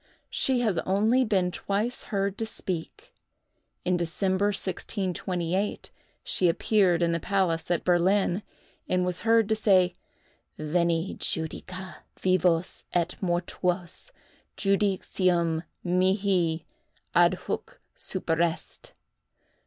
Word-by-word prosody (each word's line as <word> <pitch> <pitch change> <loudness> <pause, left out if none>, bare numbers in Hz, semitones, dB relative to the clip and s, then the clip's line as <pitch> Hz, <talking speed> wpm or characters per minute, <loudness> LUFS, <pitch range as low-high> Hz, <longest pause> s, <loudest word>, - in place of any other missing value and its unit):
She 260 -2 +1
has 210 -8 +1
only 215 +7 +2
been 190 -6 +1
twice 210 +7 -2
heard 200 -2 -1
to 225 - -1
speak. 180 -6 -5 0.7
In 180 0 +2
December, 185 +3 0
1628, 185 -1 -2 0.3
she 180 - +2
appeared 180 -1 +3
in 170 - +2
the 170 - 0
palace 170 -3 0
at 175 -2 +1
Berlin, 185 +2 +2 0.5
and 180 0 +2
was 180 -1 -2
heard 225 -1 +4
to 220 - +3
say, 185 -4 +4 0.6
"_Veni, 170 +3 0
judica 180 +2 -4 0.2
vivos 180 -2 +1
et 175 -1 +1
mortuos! 175 - -2 0.5
Judicium 185 -4 +1 0.2
mihi 180 -2 +1 0.5
adhuc - - +1 0.2
superest. 165 0 -2
185 Hz, 100 wpm, -27 LUFS, 170-200 Hz, 0.7 s, heard